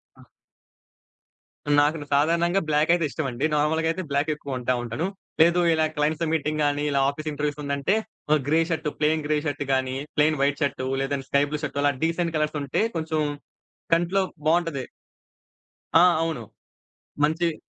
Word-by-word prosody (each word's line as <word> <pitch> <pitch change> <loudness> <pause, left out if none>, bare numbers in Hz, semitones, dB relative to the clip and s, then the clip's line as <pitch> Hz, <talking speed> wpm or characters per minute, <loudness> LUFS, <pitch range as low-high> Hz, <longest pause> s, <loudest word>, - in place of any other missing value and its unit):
ఆ! - - -18 1.5
నాకును 150 +1 0
సాధారణంగా 170 +6 +2
బ్లాక్ 150 +2 +3
అయితే 170 -2 +1
ఇష్టమండి. 135 -2 -2
నార్మల్‌గా 160 +2 +1
అయితే 185 +3 -4
బ్లాక్ 140 +2 +1
ఎక్కువ 145 -1 -10
కొంటా 125 0 0
ఉంటాను. 120 +9 -2 0.3
లేదు 170 +2 +5
ఇలా 160 -1 +2
క్లయింట్స్‌తో 155 +2 0
మీటింగ్ 155 -1 0
గాని, 145 0 0
ఇలా 140 - +2
ఆఫీస్ 155 +2 -5
ఇంటర్వ్యూస్ 150 0 -3
ఉందంటే, 140 +7 0 0.4
ఆహ్, 155 - +3
grey 155 +3 +3
shirt 165 -1 -2
plain 155 0 +1
grey 150 0 +2
shirt 145 0 -2
గాని, 130 0 0 0.2
ప్లెయిన్ 150 0 +3
వైట్ 145 +2 +1
షర్టు, 135 -2 -2
లేదంటే 135 0 -3
స్కై 140 0 +3
బ్లూ 150 - -3
షర్ట్ 140 - -3
అలా 145 - +4
డీసెంట్ 165 0 0
కలర్స్ 155 0 -1
ఉంటే 140 +9 0
కొంచెం 160 -1 -1 0.7
కంట్లో 175 +4 +2 0.2
బావుంటది. 165 -5 +1 1.1
ఆ! 165 - +9 0.2
అవును. 165 -7 -2 0.8
మంచియి 165 +2 +1
150 Hz, 155 wpm, -25 LUFS, 140-165 Hz, 1.5 s, ఆ